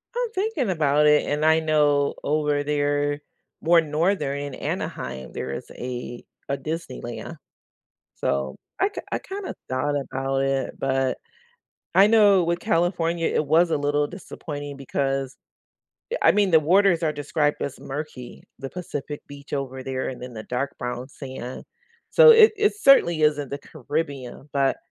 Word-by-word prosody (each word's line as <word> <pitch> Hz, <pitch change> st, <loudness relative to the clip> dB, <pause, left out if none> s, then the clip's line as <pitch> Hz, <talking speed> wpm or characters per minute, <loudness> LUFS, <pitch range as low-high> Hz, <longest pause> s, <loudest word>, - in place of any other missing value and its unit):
I'm 485 Hz, -2 st, -1 dB
thinking 375 Hz, -, -1 dB
about 150 Hz, -3 st, +3 dB
it, 150 Hz, 0 st, +5 dB
and 150 Hz, +1 st, 0 dB
I 160 Hz, 0 st, +5 dB
know 150 Hz, -2 st, +2 dB
over 150 Hz, -1 st, +1 dB
there 145 Hz, 0 st, 0 dB, 0.4 s
more 170 Hz, +1 st, +5 dB
northern 155 Hz, -2 st, 0 dB
in 145 Hz, -1 st, -5 dB
Anaheim, 65 Hz, -1 st, -4 dB
there 65 Hz, -, -4 dB
is 70 Hz, -, -6 dB
a 120 Hz, -1 st, -6 dB, 0.2 s
a 140 Hz, -, -1 dB
Disneyland. 160 Hz, -, -6 dB, 0.8 s
So 70 Hz, -1 st, -1 dB, 0.2 s
I 390 Hz, -, +3 dB
k 415 Hz, -, -7 dB
I -, -, 0 dB
kinda 390 Hz, 0 st, -6 dB, 0.2 s
thought 145 Hz, +3 st, 0 dB
about 135 Hz, -1 st, -2 dB
it, 135 Hz, -1 st, 0 dB
but 135 Hz, -1 st, 0 dB, 0.8 s
I 195 Hz, +2 st, +7 dB
know 205 Hz, -5 st, +5 dB
with 170 Hz, +1 st, -1 dB
California 170 Hz, -3 st, +1 dB
it 150 Hz, -, 0 dB
was 165 Hz, +3 st, +4 dB
a -, -, +2 dB
little 145 Hz, +1 st, +1 dB
disappointing 145 Hz, -5 st, -7 dB
because 135 Hz, 0 st, -2 dB, 0.9 s
I -, -, +6 dB
mean, 205 Hz, -2 st, +2 dB
the 160 Hz, -, +7 dB
waters 180 Hz, +2 st, +3 dB
are 155 Hz, -, +1 dB
described 145 Hz, +1 st, -1 dB
as 140 Hz, -, -4 dB
murky, 135 Hz, -3 st, -7 dB, 0.2 s
the 135 Hz, 0 st, -6 dB
Pacific 150 Hz, -5 st, -6 dB
Beach 140 Hz, 0 st, -12 dB
over 130 Hz, -2 st, -3 dB
there, 130 Hz, -1 st, -3 dB
and 125 Hz, -, -7 dB
then 125 Hz, 0 st, -8 dB
the 110 Hz, -, -6 dB
dark 125 Hz, +5 st, -3 dB
brown 125 Hz, +1 st, -4 dB
sand. 130 Hz, -2 st, -8 dB, 0.5 s
So -, -, +8 dB
it 450 Hz, -1 st, +8 dB
it 420 Hz, 0 st, +3 dB
certainly 170 Hz, -, +5 dB
isn't 145 Hz, -2 st, +2 dB
the 140 Hz, -, -4 dB
Caribbean, 145 Hz, -2 st, -5 dB
but 140 Hz, -1 st, +2 dB
145 Hz, 155 wpm, -24 LUFS, 135-165 Hz, 0.9 s, So